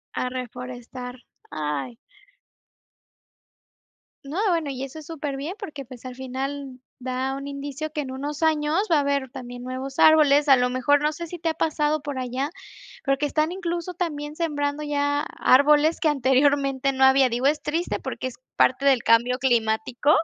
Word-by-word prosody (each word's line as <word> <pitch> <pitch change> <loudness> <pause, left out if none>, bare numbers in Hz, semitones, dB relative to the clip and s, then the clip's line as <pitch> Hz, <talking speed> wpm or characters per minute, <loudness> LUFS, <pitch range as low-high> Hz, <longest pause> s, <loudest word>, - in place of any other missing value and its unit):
A 250 - -1
reforestar. 250 0 -7 0.4
Ay. 150 - -3 2.3
No, 300 +7 -4
bueno, 325 -5 0
y 265 0 -5
eso 275 +3 -7
es 310 - -9
superbién, 295 0 -4
porque, 295 - -7
pues, 250 -1 -12
al 255 -1 -7
final, 265 +1 -5 0.2
da 260 +1 -2
un 275 +1 -6
indicio 285 +2 -5
que 305 -1 -2
en 270 - -6
unos 285 +3 -5
años 320 +5 +2
va - - +6
a - - +4
haber 280 -2 0
también 245 -2 -8
nuevos 260 +2 -5
árboles. 300 -2 +6
A 270 - +9
lo 250 0 +1
mejor, 270 +3 +3
no 300 - +2
sé 340 +2 -6
si 350 +2 -7
te 330 0 -1
ha - - 0
pasado 305 -1 0
por 285 -2 -5
allá 255 +3 -2 0.6
porque 275 +1 +1
están, 305 +3 0
incluso, 350 -1 -3
también 300 -4 -4
sembrando 290 -3 -1
ya 285 0 0 0.2
árboles 295 +4 +5
que, - - +1
anteriormente, 275 0 +2
no 265 0 +1
había. 265 0 +6
Digo, 245 +2 -2
es 295 +2 +3
triste, 325 +4 -2
porque - - -5
es 250 - -8 0.2
parte 260 +2 +3
del 265 -4 +4
cambio 235 +2 +4
climático, 240 +1 +1
275 Hz, 170 wpm, -24 LUFS, 255-300 Hz, 2.3 s, A